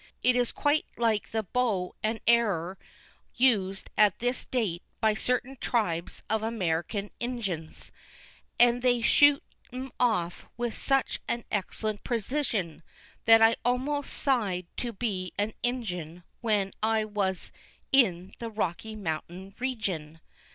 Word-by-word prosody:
It 250 0 +5
is 245 -1 +2
quite 290 +1 +1
like 225 -3 +1
the 220 -1 -1
bow 205 -4 0
and 220 +1 -1
arrer 195 -7 +2 0.6
used 200 -7 +2
at 210 -2 +5
this 245 +2 -1
date 205 -9 -1 0.2
by 220 -1 +3
certain 250 +4 -1
tribes 175 -8 -1
of 220 0 0
American 200 -2 -1
Injuns, 205 -10 -4 0.7
and 245 0 +5
they 245 -1 +3
shoot 290 +3 +6 0.3
'em 260 +1 -6
off 195 -9 +1
with 240 -1 -1
such 270 -2 +1
an 235 -1 -2
excellent 210 +1 -2
precision 225 - -1 0.4
that 225 -1 +8
I 225 +1 +6
almost 265 +4 0
sigh'd 205 -10 0
to 240 - -2
be 195 -5 -3
an 210 +2 0
Injun 180 -9 -3 0.2
when 210 -4 +1
I 220 0 +2
was 200 -3 -2 0.4
in 190 -9 +3
the 230 - -4
Rocky 215 0 -3
Mountain 185 +1 -5
regin. 190 -12 -3
220 Hz, 130 wpm, -28 LUFS, 190-245 Hz, 0.7 s, that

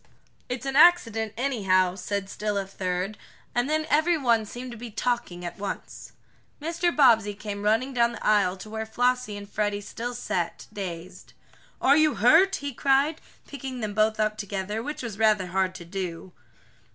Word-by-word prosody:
"It's 250 +1 -4
an 270 0 -2
accident, 230 -10 +5
anyhow," 195 -8 +2
said 200 +1 -3
still 210 +1 -3
a 195 - -1
third, 190 +1 -3 0.3
and 245 +3 0
then 310 0 +1
every 320 +3 +3
one 235 -6 +2
seemed 245 +3 -7
to - - -7
be 240 +1 -7
talking 215 -5 -2
at 175 - -6
once. 200 - -6 0.5
Mr. 335 +3 0
Bobbsey 225 -9 +4
came 205 -1 -6
running 225 +6 +1
down 235 -1 +2
the - - -8
aisle 200 -3 +3
to 215 - -10
where 220 0 -4
Flossie 245 -2 0
and 205 0 -9
Freddie 205 0 -1
still 235 +4 -6
sat, 175 -7 -3
dazed. 180 -3 -7 0.5
"Are 275 +2 +5
you 310 -2 +3
hurt?" 325 - +5
he 285 -1 -5
cried, 280 +5 +2 0.2
picking 265 -3 -7
them 210 -1 -3
both 215 +1 +2
up 215 0 +1
together, 205 +1 -3
which 290 +2 -5
was 220 -3 -6
rather 215 -4 +3
hard 185 +1 -1
to 170 - -9
do. 180 0 -5
220 Hz, 175 wpm, -26 LUFS, 200-255 Hz, 0.5 s, accident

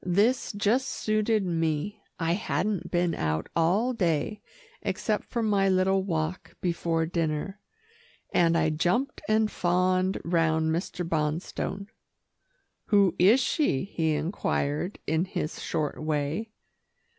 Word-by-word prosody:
This 205 +8 +2
just 215 +6 +1
suited 215 -1 +1
me. 165 +4 -1 0.2
I 165 -1 +1
hadn't 200 +1 -1
been 175 -1 +1
out 80 0 -2
all 195 +10 +2
day, 180 - 0 0.4
except - - -1
for 235 -2 -2
my 200 -3 +3
little 190 +1 +3
walk 165 -2 -3
before 165 -2 0
dinner, 165 +3 -2 0.7
and 170 -1 +4
I 160 -1 +2
jumped 230 - 0
and 215 0 +3
fawned 185 +1 +1
round 160 -2 +2
Mr. 175 +1 -2
Bonstone. 165 +5 -2 1.0
"Who 200 -4 +4
is 210 +8 +6
she?" 260 - +1
he 160 -5 0
inquired 155 +1 -1
in 160 +3 +1
his 160 -4 -4
short 155 -3 -2
way. 155 +7 -1
175 Hz, 120 wpm, -27 LUFS, 160-205 Hz, 1.0 s, is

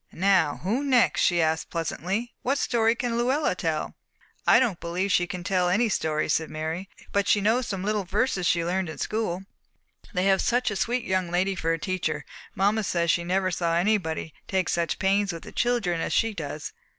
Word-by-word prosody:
"Now 185 -5 +2
who 225 +9 0
next?" 255 -4 +3
she 175 -2 +3
asked 160 0 0
pleasantly. 185 +7 -3
"What 270 +3 0
story 230 -3 +2
can 235 -1 -1
Luella 265 +6 +1
tell?" - - -2 0.5
"I - - +7
don't 235 -9 0
believe 180 +4 -2
she 175 -1 +3
can 180 0 -5
tell 180 -1 +1
any 220 +6 +2
story," 155 -5 0
said 160 0 0
Mary, 160 +4 -4 0.2
"but 200 0 +1
she 205 - +4
knows 225 +4 +1
some 195 -2 -3
little 210 0 0
verses 190 -1 0
she 170 -1 +2
learned 185 0 -1
in 160 - -7
school. 200 -4 -2 0.7
They 185 -3 0
have 195 -1 +4
such 245 -1 +1
a - - -3
sweet 240 +5 0
young 185 -5 0
lady 185 +3 +1
for 165 -3 -1
a 165 - +1
teacher; 160 -4 -2 0.3
mamma 205 +3 +2
says 170 -3 +1
she 170 - 0
never 185 +1 0
saw 170 -1 0
anybody 175 -4 0
take 190 -2 0
such 170 -1 0
pains 195 +1 +2
with 165 -1 -8
the - - -10
children 220 -9 0
as - - -2
she 225 -1 +2
does." 150 -4 -6
190 Hz, 200 wpm, -26 LUFS, 170-215 Hz, 0.7 s, I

